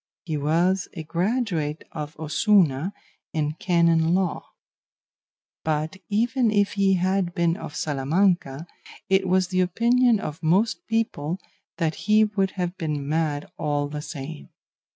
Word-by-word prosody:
He 160 -3 -2
was 170 +6 +1
a 160 - -5
graduate 170 - -1
of 150 -1 -6
Osuna 160 0 +2 0.4
in 150 -2 0
canon 170 -2 +3
law; 185 -3 -1 1.2
but 155 +3 -1
even 230 +3 +2
if 205 -1 +2
he 195 -1 +3
had 185 -1 0
been 170 -1 +2
of 150 -6 -8
Salamanca, 155 +1 0 0.4
it 190 0 +3
was 185 0 +2
the 185 0 +1
opinion 235 +5 +3
of 155 -5 -6
most 210 - +1
people 185 -8 -1 0.4
that 165 -3 0 0.2
he 215 +1 +6
would 200 -2 +1
have 180 0 -2
been 150 -4 -2
mad 150 -1 0
all 145 -2 0
the 150 0 -5
same. 150 0 -8
175 Hz, 130 wpm, -24 LUFS, 155-195 Hz, 1.2 s, he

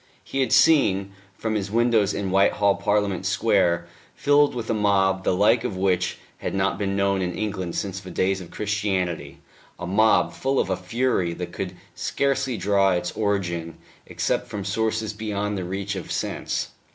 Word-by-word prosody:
He 135 - -4
had 130 -4 +1
seen, 130 -9 +4 0.3
from 110 -1 -2
his 105 -2 -2
windows 115 -2 +3
in 100 -2 -3
Whitehall, 100 +1 +3
Parliament 100 -2 0
Square 95 -4 +2 0.3
filled 145 -1 +3
with 115 -2 -4
a - - +2
mob 95 -2 +2
the 90 - +1
like 110 +5 +4
of 115 -7 -3
which 95 -1 +1 0.2
had - - -3
not 95 +1 0
been 100 -1 -1
known 100 -1 +1
in 90 -1 -2
England 95 -5 -3
since 95 -1 -3
the 95 -1 -10
days 95 +1 0
of 85 - -10
Christianity 100 -5 -2 0.4
a 90 - -6
mob 110 +5 +3
full 135 0 0
of 95 - 0
a - - +2
fury 95 -3 -1
that 90 0 -5
could 95 -1 -4 0.2
scarcely 135 -3 -1
draw 100 0 +3
its 90 - -1
origin 85 -6 -2 0.3
except - - -1
from 100 -2 -5
sources 110 +2 -1
beyond 105 -1 -3
the 95 - -3
reach 95 +2 -3
of 95 - -6
sense. - - -2
100 Hz, 175 wpm, -24 LUFS, 95-110 Hz, 0.4 s, seen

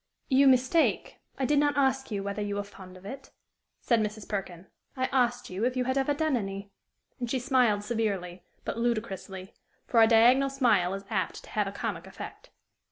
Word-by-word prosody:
"You 275 0 +5
mistake: 260 +5 +2 0.2
I 270 - 0
did 290 +2 +3
not 290 0 +2
ask 265 -1 +1
you 200 -3 -3
whether 200 +1 -3
you 205 0 -2
were 205 - -2
fond 190 -2 -13
of 185 - -16
it," 270 +5 -8 0.5
said 235 -2 +2
Mrs. 215 -1 -3
Perkin; 190 -3 -5 0.3
"I 260 - +1
asked 245 -4 +1
you 190 +4 -3
if 255 +1 0
you 250 - +2
had 260 +1 -1
ever 275 +1 +1
done 310 -1 +1
any"; 200 -2 -4 0.5
and 245 -2 -3
she 260 - 0
smiled 245 -5 +2
severely, 200 -5 -2 0.2
but - - -3
ludicrously, 195 -5 -3 0.3
for 230 - +3
a 225 - +7
diagonal 245 +4 +5
smile 215 -9 +2
is 195 - -8
apt - - -2
to - - -14
have - - 0
a - - -4
comic - - -4
effect. - - -10
230 Hz, 195 wpm, -28 LUFS, 200-260 Hz, 0.5 s, a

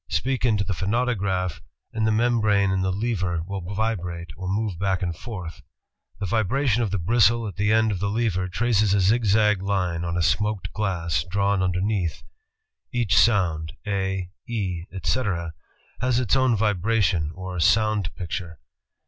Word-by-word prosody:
Speak 125 - 0
into 110 -4 +2
the 100 - -2
phonautograph, 95 - -1 0.3
and 110 -1 0
the - - +3
membrane 110 -4 +2
and 95 0 0
lever 95 -3 -1
will 100 +1 -4
vibrate, 90 -4 -3
or 95 +2 -6
move 100 -3 -1
back 95 -1 0
and 85 -2 -2
forth. 90 -5 -7 0.6
The 100 - -2
vibra 115 +8 0
tion 120 0 +3
of 115 - 0
the 100 - -1
bristle 115 +4 +3
at 100 - -7
the 105 +1 +1
end 110 0 +3
of 95 - -2
the 100 +2 -1
lever 100 -4 0
traces 105 +1 +2
a - - +3
zigzag 105 0 +3
line 90 -4 -1
on 85 0 -2
a 85 - +1
smoked 105 +3 0
glass 85 -8 -1
drawn 100 +1 +1
underneath. 90 -1 -1 0.7
Each 120 -5 0
soimd, 85 -9 +3
^^A," 95 -2 -2 0.2
^^E," 95 -7 -2
etc., 90 -3 -1 0.5
has 125 0 +1
its 125 0 +1
own 130 -3 +3
vibration 105 -5 +1
or 95 0 -6
soimd 105 +1 +2
picture. 85 -1 -5
100 Hz, 155 wpm, -24 LUFS, 90-110 Hz, 0.7 s, the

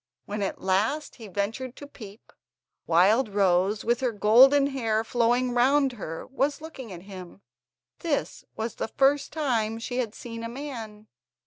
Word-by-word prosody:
When 205 0 -4
at 195 - -2
last 215 +11 0
he 225 -3 -10
ventured 220 +6 -3
to 285 - -10
peep, 220 -7 -13 0.5
Wildrose, 195 +1 +3
with 240 +1 +2
her 255 -2 0
golden 250 +7 +6
hair 225 -6 0
flowing 245 +2 +1
round 265 +3 +3
her, 165 -9 -7
was 275 +2 -1
looking 290 -8 -9
at 175 -1 -9
him. 190 -1 -11 0.6
This 320 -5 -2
was 225 0 -3
the - - -2
first 275 +4 +2
time 235 -8 -1
she 245 +2 -5
had 230 -3 -2
seen 230 -1 -8
a 230 - -4
man. 230 -5 -7
230 Hz, 150 wpm, -26 LUFS, 205-270 Hz, 0.6 s, golden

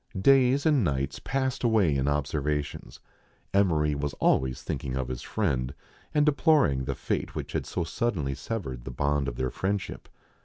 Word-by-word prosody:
Days 135 - +4
and 150 -6 +4
nights 70 -5 -1
passed 130 -1 -2
away 105 -10 +3
in 70 0 0
observations. 75 0 -2 0.5
Emery 80 -7 +3
was 70 0 -3
always 65 -1 +1
thinking 65 -2 -3
of 65 -2 -2
his 65 -1 -4
friend, 70 -11 -1 0.4
and 150 -1 +3
deploring 140 - +3
the 70 0 -2
fate - - -3
which - - -4
had - - -2
so 90 - -2
suddenly 85 - -1
severed 65 - -5
the 65 - -6
bond 70 +2 0
of - - -3
their 65 0 -2
friend 100 +7 0
ship. - - -9
75 Hz, 165 wpm, -27 LUFS, 65-115 Hz, 0.5 s, Days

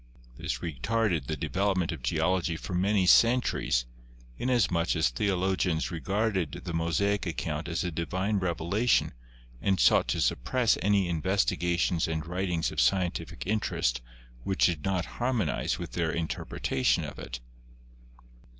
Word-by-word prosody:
This - - -3
retarded 85 - -1
the - - -2
develop 100 0 0
ment 90 -3 0
of 80 -5 -6
Geology 85 +6 0
for 95 - -7
many 95 +2 +2
centuries, 115 - +3 0.5
inasmuch 90 - +1
as 80 -7 +2
theolo 95 - 0
gians 85 -2 0
regarded 95 -2 -1
the 85 - -5
Mosaic 90 +5 0
account 80 +1 -3
as 85 0 -2
a 90 - -2
divine 95 +6 -1
revelation 90 +6 +1 0.5
and 95 -2 +1
sought - - +5
to - - -1
suppress 115 - +2
any 100 -2 +2
investigations 85 0 +1
and 80 -1 -3
writings 90 -1 -1
of - - 0
scientific 95 -3 0
interest 90 - 0 0.4
which 95 0 +2
did 80 -5 0
not 95 -2 0 0.2
harmonize 120 - 0
with 85 -2 -6
their 85 -2 -1
in 85 -1 -2
terpretation 65 -4 -1
of - - -9
it. - - -6
90 Hz, 140 wpm, -28 LUFS, 80-100 Hz, 0.5 s, sought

